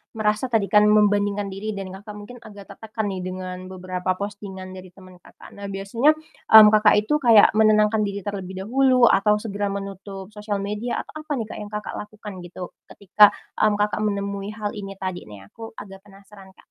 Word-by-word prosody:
merasa 215 +3 0
tadi 225 -4 +1
kan 210 0 +5
membandingkan 205 -1 +2
diri 215 +2 -5
dan 195 -1 -6
Kakak 205 +2 -10
mungkin 225 +4 -11
agak 205 -3 -12
tertekan 220 +1 -5
nih 185 -1 -5
dengan 185 0 -6
beberapa 185 0 -5
postingan 200 -2 -7
dari 185 -1 -11
teman 185 -2 -16
Kakak. - - -16
Nah 200 0 -8
biasanya, 215 +10 +1
mmm, 220 -8 +6
Kakak 215 0 +5
itu 210 +7 0
kayak 230 -6 +6
menenangkan 215 0 +3
diri 200 -1 -5
terlebih 190 -2 -6
dahulu 255 +3 +2
atau 210 -1 +4
segera 205 -1 -3
menutup 195 0 -7
sosial 210 -1 -4
media 210 +4 -3
atau - - -17
apa 310 0 -10
nih, 230 - -3
Kak, - - -7
yang 210 - -7
Kakak 210 - -5
lakukan 210 0 -9
gitu 175 0 -9 0.2
ketika, 205 +1 +5 0.2
mmm, 215 -1 +3
Kakak 210 +1 -1
menemui 200 -1 -2
hal 210 -1 -4
ini 195 -1 -7
tadi 185 - -6
nih? 105 -2 -12
Aku 225 0 -11
agak 195 -2 -10
penasaran, 195 -1 -17
Kak. - - -22
205 Hz, 185 wpm, -23 LUFS, 195-215 Hz, 0.2 s, mmm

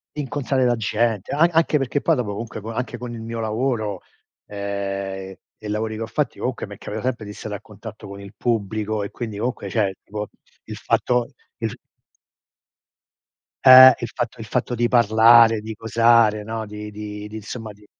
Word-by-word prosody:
Incontrare 135 -2 -1
la 120 - +3
gente. 110 -1 -1
An 165 +4 +4
anche 165 -2 +3
perché 135 +1 -1
poi 165 - +3
dopo 120 -6 -2
comunque 110 +2 -6
anche 125 +2 -4
con 120 -1 -7
il 115 - -7
mio 115 +1 -5
lavoro, 110 -3 -2 0.5
ehm, 100 -1 -4 0.2
e - - -13
i - - -5
lavori 110 +1 -2
che 110 - -6
ho - - -5
fatti, - - -2
comunque - - -3
mi - - -9
è - - -18
capitato 110 +4 -5
sempre 120 -4 -3
di 105 - -8
stare 105 0 -6
a 100 - -8
contatto 105 0 -11
con 100 0 -9
il 100 0 -11
pubblico 110 -2 -1
e 100 - -6
quindi 110 -4 -6
comunque, 120 +4 -3
cioè, 100 -4 0
tipo, 105 0 -5 0.4
il - - -7
fatto 125 -1 0 0.3
il 115 -1 -2
f - - -11 1.9
Eh, 130 0 +11
il 120 - -3
fatto 120 0 -4
il 110 - -6
fatto 125 +2 -2
di 120 0 +1
parlare, 115 -1 +6
di 110 +1 -6
cosare, 115 -1 +3
no, 110 +1 -4
di 105 0 -8
di 105 0 -7
di 105 - -10
insomma 110 +1 -7
di 105 +1 -21
110 Hz, 190 wpm, -22 LUFS, 105-120 Hz, 1.9 s, Eh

